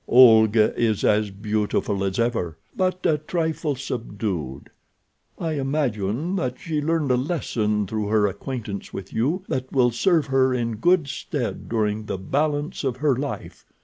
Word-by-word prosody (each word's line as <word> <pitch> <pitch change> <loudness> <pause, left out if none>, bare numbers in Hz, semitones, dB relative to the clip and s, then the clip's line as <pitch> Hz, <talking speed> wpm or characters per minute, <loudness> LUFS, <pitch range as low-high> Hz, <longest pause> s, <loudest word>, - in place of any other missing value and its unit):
Olga 110 -3 +6
is 110 -3 +1
as 105 0 +3
beautiful 105 0 -1
as 95 -1 -1
ever, 115 -9 -1 0.2
but 185 0 -1
a 155 -4 +3
trifle 160 -2 -1
subdued. 105 - -4 0.7
I 165 - -2
imagine 135 - -1
that 130 -7 -2
she 160 -4 -2
learned 155 -2 +1
a - - +4
lesson 115 - -1
through 105 +1 -2
her 105 0 +3
acquaintance 100 +1 -4
with 95 -1 -8
you 150 +12 0
that 130 0 -3
will 125 -3 +3
serve 165 - +2
her 130 -1 +2
in 115 -3 -2
good 175 +4 +3
stead 130 -2 -4
during 110 -1 0
the - - -2
balance 145 +10 -1
of 130 -3 -1
her 145 -1 +2
life. 140 +3 -6
125 Hz, 150 wpm, -24 LUFS, 105-145 Hz, 0.7 s, Olga